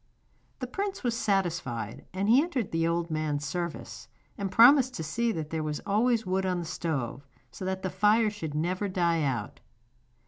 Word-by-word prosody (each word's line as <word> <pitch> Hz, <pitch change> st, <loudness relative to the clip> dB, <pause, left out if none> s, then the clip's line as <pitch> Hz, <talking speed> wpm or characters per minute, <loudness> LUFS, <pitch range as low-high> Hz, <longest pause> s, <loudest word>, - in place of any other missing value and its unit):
The 255 Hz, -, -4 dB
prince 390 Hz, +7 st, -4 dB
was 240 Hz, -2 st, 0 dB
satisfied, 170 Hz, -, -1 dB
and 190 Hz, +2 st, -2 dB
he 245 Hz, +5 st, +6 dB
entered 280 Hz, -, -2 dB
the 165 Hz, 0 st, +1 dB
old 170 Hz, 0 st, -1 dB
man's 150 Hz, -2 st, -1 dB
service, 170 Hz, +3 st, -5 dB, 0.3 s
and 200 Hz, -3 st, -3 dB
promised 255 Hz, +2 st, +6 dB
to 160 Hz, -, -4 dB
see 230 Hz, +10 st, 0 dB
that 160 Hz, -5 st, -4 dB
there 160 Hz, -1 st, -1 dB
was 150 Hz, -1 st, -3 dB
always 225 Hz, +2 st, +2 dB
wood 190 Hz, +1 st, 0 dB
on 185 Hz, -1 st, 0 dB
the 175 Hz, -, -3 dB
stove, 140 Hz, -5 st, -3 dB, 0.2 s
so 185 Hz, -, -7 dB
that 190 Hz, 0 st, -3 dB
the 185 Hz, -, -2 dB
fire 210 Hz, +3 st, +3 dB
should 160 Hz, -8 st, -6 dB
never 185 Hz, +6 st, -1 dB
die 170 Hz, -3 st, +1 dB
out. 135 Hz, -4 st, -2 dB
185 Hz, 180 wpm, -28 LUFS, 160-220 Hz, 0.3 s, he